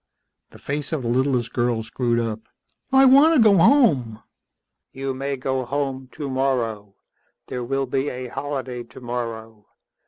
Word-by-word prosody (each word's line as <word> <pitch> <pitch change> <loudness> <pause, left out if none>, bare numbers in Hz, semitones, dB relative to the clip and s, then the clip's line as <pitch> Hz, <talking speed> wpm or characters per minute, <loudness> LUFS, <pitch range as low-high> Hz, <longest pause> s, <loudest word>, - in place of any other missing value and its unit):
The - - -15
face 145 +1 -4
of 155 -5 -2
the - - -3
littlest 125 -1 0
girl 120 -2 0
screwed 120 +1 -1
up. 115 -2 -2 0.5
"I 270 0 +6
want 280 +5 +6
to - - +4
go 215 -3 +6
home." 160 - +3 0.7
"You 135 0 -4
may 135 +1 -3
go 130 0 -2
home 135 0 -3
tomorrow. 125 -7 -2 0.5
There 125 -1 -4
will 135 +2 -1
be 135 +2 -1
a 125 0 -6
holiday 130 -2 -4
tomorrow. 115 -3 -7
130 Hz, 145 wpm, -22 LUFS, 120-140 Hz, 0.7 s, I